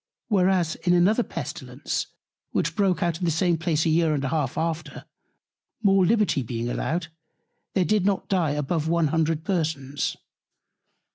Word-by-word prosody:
Whereas 185 -5 +2
in 175 - +1
another 190 +7 +4
Pestilence, - - -4 0.5
which - - 0
broke 195 -3 +1
out 170 -1 -1
in 180 - -1
the - - +2
same 170 +2 +2
Place 160 -1 0
a - - +2
year 160 -1 +3
and 140 - -2
half 140 -1 -1
after, 165 0 -3 0.8
more 195 -2 +5
Liberty 210 -7 +2
being 120 -1 -3
allowed, 165 +6 -2 0.7
there 185 -2 +3
did 210 -1 +2
not 195 -1 0
dye 180 -5 +1
above 150 +2 -1
one 165 -2 +2
hundred 160 0 0
Persons. 155 -6 -2
165 Hz, 150 wpm, -25 LUFS, 155-185 Hz, 0.8 s, more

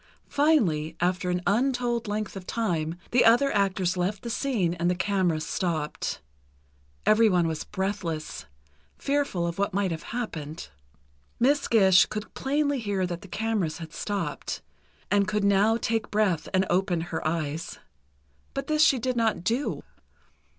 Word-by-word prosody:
Finally, 185 - +2
after 180 +1 0
an 180 0 -1
untold 240 +2 +1
length 210 0 -3
of 190 -2 -8
time, 170 -8 -1 0.2
the 245 - +5
other 240 +3 +4
actors 190 -2 +1
left 185 +3 -2
the 235 - -4
scene 225 -9 0
and 175 0 0
the 180 - +1
cameras 185 -4 0
stopped. 160 -5 -2 0.8
Everyone 215 -6 +4
was 160 -2 -3
breathless, 185 - -4 0.5
fearful 280 -11 0
of 170 +2 -4
what 200 -1 0
might 200 -2 +1
have 160 -1 -4
happened. 165 -10 -5 0.7
Miss 280 +4 +3
Gish 190 -5 +6
could 210 0 -6
plainly 285 0 0
hear 200 -4 -1
that 175 -1 -5
the 200 - -11
cameras 205 -4 -1
had 165 -2 -9
stopped, 195 -8 -3 0.5
and 200 0 +3
could 210 -1 0
now 200 +3 +4
take 225 -2 -1
breath 195 -7 +1
and 190 0 +2
open 180 -1 +1
her 160 - -2
eyes. 155 -1 -3 0.8
But 275 - -2
this 305 0 +1
she 275 - +5
did 250 +1 -1
not 225 -6 +1
do. 240 +8 -1
200 Hz, 150 wpm, -27 LUFS, 175-230 Hz, 0.8 s, Gish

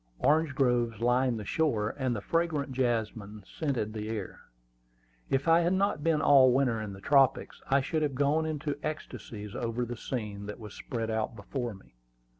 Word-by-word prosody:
Orange 150 - +2
groves 120 -5 +1
lined 120 0 +2
the 105 - -7
shore, 110 -7 0
and 130 -3 -1
the 105 - -4
fragrant 160 -1 0
jasmine 110 -5 -2
scented 125 -8 -2
the 110 0 -4
air. 105 -4 -5 0.9
If 135 +2 0
I 165 +1 +6
had 175 +2 +2
not 190 -5 +1
been 160 -2 +2
all 135 -3 +7
winter 125 -4 +2
in 105 -2 -5
the 95 - -10
tropics, 135 +2 +2
I 140 +1 +4
should 155 +4 -1
have 145 -3 0
gone 145 +4 +2
into 145 -2 -3
ecstasies 115 -9 -6
over 120 +1 -2
the 120 +1 -5
scene 105 -4 -5
that 105 - -7
was 105 -2 -9
spread 115 -3 -4
out 110 +1 -2
before 115 +2 -4
me. 95 - -19
125 Hz, 180 wpm, -29 LUFS, 110-145 Hz, 0.9 s, all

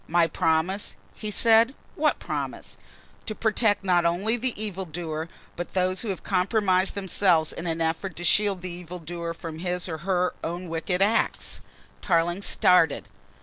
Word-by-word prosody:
"My 170 +1 +4
promise," 165 +4 0 0.2
he 215 - -5
said, 230 +4 +5 0.2
"what - - +1
promise?" - - -5 0.5
"To 215 - -2
protect, 215 -2 +1
not 180 -2 +3
only 180 +7 +1
the 245 -2 -2
evil 195 -3 -3
doer, 160 -1 -5 0.3
but 175 +2 -6
those 185 0 +1
who 235 - -5
have 190 - -4
compromised 190 -1 +2
themselves 185 -4 +2
in 170 - -5
an 165 0 -2
effort 165 +2 -1
to 175 - -6
shield 195 +1 +2
the 180 - -4
evil 175 0 -7
doer 170 0 -5
from 160 -1 -7
his 180 +1 -2
or 160 -2 -4
her 180 +1 0
own 175 +2 -4
wicked 180 +3 0
act." 220 +3 0 0.4
Tarling 175 0 +1
started. 180 -5 +3
180 Hz, 160 wpm, -26 LUFS, 170-200 Hz, 0.5 s, said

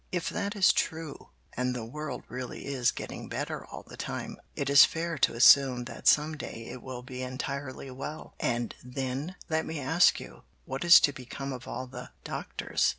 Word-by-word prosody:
"If 180 -1 -1
that 200 +1 -3
is 195 -2 +5
true, 160 -2 -3 0.3
and 125 0 0
the 120 -2 -4
world 140 +1 -6
really 125 0 -6
is 130 -3 +1
getting - - -6
better - - -3
all - - -10
the - - -12
time, - - -5 0.2
it 140 - -2
is 140 0 +9
fair 170 0 0
to 115 - +3
assume 125 +1 +7
that 120 - -6
some 150 +1 +5
day 115 -6 -7
it 125 0 -8
will 125 -1 -7
be 130 0 -7
entirely 130 +1 -5
well, 150 +4 -7
and 120 -1 -1
then, 135 +6 -4
let 160 -1 +1
me 160 -1 -4
ask 160 +6 +4
you, - - -11 0.2
what 135 +3 -4
is 170 0 +10
to 145 - +3
become 135 +1 -6
of 125 -1 -8
all 130 - -4
the 125 -1 -9
doctors? - - -1
135 Hz, 190 wpm, -29 LUFS, 125-155 Hz, 0.3 s, is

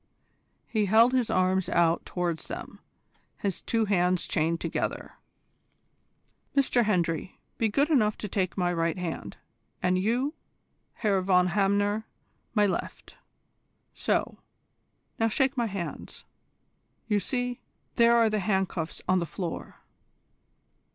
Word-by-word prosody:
He 215 -3 0
held 225 +5 +5
his 250 -3 +1
arms 185 0 +2
out 170 -2 +2
towards 175 -3 -2
them, - - -7 0.6
his 195 -3 -2
two 225 -1 0
hands 180 -3 +1
chained 165 +1 0
together. - - -3 1.4
"Mr 250 -3 +3
Hendry, 175 -4 -1 0.2
be 225 - +2
good 280 +8 +2
enough 215 -8 +3
to 210 - -5
take 190 -1 -2
my 175 -1 +1
right 165 0 0
hand, 165 - -5 0.4
and 185 0 +1
you, 245 +9 0 0.6
Herr 200 -4 +1
von 180 -1 +3
Hamner, 205 +2 +1 0.5
my 210 -1 +5
left. 195 - -4 0.8
So; - - -1 0.8
now 225 - +3
shake 265 +5 +1
my 240 -3 0
hands. 195 -4 -6 0.8
You 210 -2 +2
see, 245 +2 -2 0.4
there 235 0 +6
are 230 -1 +5
the 215 - +1
handcuffs 190 -4 -1
on 185 0 +3
the 170 - -3
floor." 175 -1 -6
195 Hz, 125 wpm, -28 LUFS, 180-225 Hz, 1.4 s, there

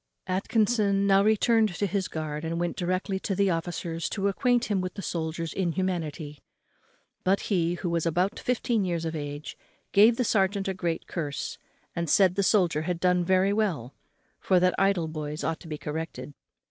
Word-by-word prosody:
Atkinson 200 +1 +1
now 195 0 +5
returned 220 -1 +3
to 205 - 0
his 195 -1 -1
guard 155 -1 -4
and 165 +1 -2
went 175 0 -1
directly 185 +2 -1
to 195 - -2
the 200 0 +2
officer 165 0 -3
to 195 +5 -1
acquaint 245 +5 +1
him 200 -3 0
with 185 0 -5
the 200 - -6
soldier's 165 -1 -3
inhumanity, 170 -5 -2 0.8
but 195 +2 +2
he, 175 -2 +2
who 180 - -4
was 170 -1 0
about 180 +4 0
fifteen 240 -3 0
years 170 -3 -2
of 160 0 -3
age, 145 0 -6 0.4
gave 220 +4 +6
the 250 - +2
serjeant 200 -2 +1
a 190 - 0
great 170 -3 -3
curse 145 -5 -4 0.4
and 170 -2 -2
said 190 +1 +5
the 200 - 0
soldier 180 -6 +3
had 170 +1 -2
done 180 0 +2
very 190 +2 +3
well, 175 - -1 0.5
for 185 -2 +3
that 180 0 +3
idle 195 -4 +2
boys 155 -1 -5
ought 165 -1 -1
to 170 - -12
be 155 -1 -4
corrected. 150 -3 -5
180 Hz, 180 wpm, -27 LUFS, 165-200 Hz, 0.8 s, gave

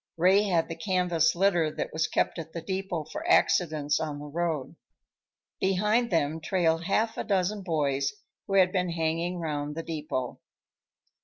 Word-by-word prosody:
Ray 190 +5 +4
had 175 -5 +1
the 165 - -5
canvas 175 -2 +1
litter 175 -4 +3
that - - -4
was 160 +1 +1
kept - - 0
at 165 0 -8
the 170 - -4
depot 190 -4 -3
for 310 - -7
accidents 155 - +3
on 150 -2 -3
the 145 - -8
road. 155 -2 -2 0.8
Behind 210 +5 +2
them 160 -2 0
trailed 165 -1 +1
half 220 +4 +1
a - - -1
dozen 200 0 0
boys 145 -6 0 0.4
who 195 - -1
had 185 -2 +5
been 180 -2 0
hanging 165 +2 -1
round 150 -3 -3
the 165 - -4
depot. 150 -6 -4
170 Hz, 160 wpm, -28 LUFS, 155-190 Hz, 0.8 s, had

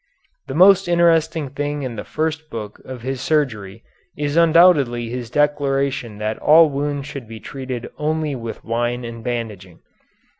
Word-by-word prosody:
The 135 - -5
most 190 +2 +6
interesting 165 -3 +2
thing 145 +1 -3
in 125 -3 -4
the 105 - -5
first 160 0 -3
book 105 -4 -7
of 130 -3 -9
his 130 0 -3
surgery 115 -9 -1 0.3
is 145 0 -2
undoubtedly 160 -8 +4
his 120 -1 -5
declaration 140 -5 0
that 105 +1 -3
all 155 0 +6
wounds 145 0 -2
should 140 -5 -8
be 110 0 -9
treated 130 -1 -6
only 155 0 -1
with 115 -3 -7
wine 120 +1 -1
and 115 -1 -8
bandaging. 105 -8 -5
135 Hz, 150 wpm, -20 LUFS, 115-155 Hz, 0.3 s, most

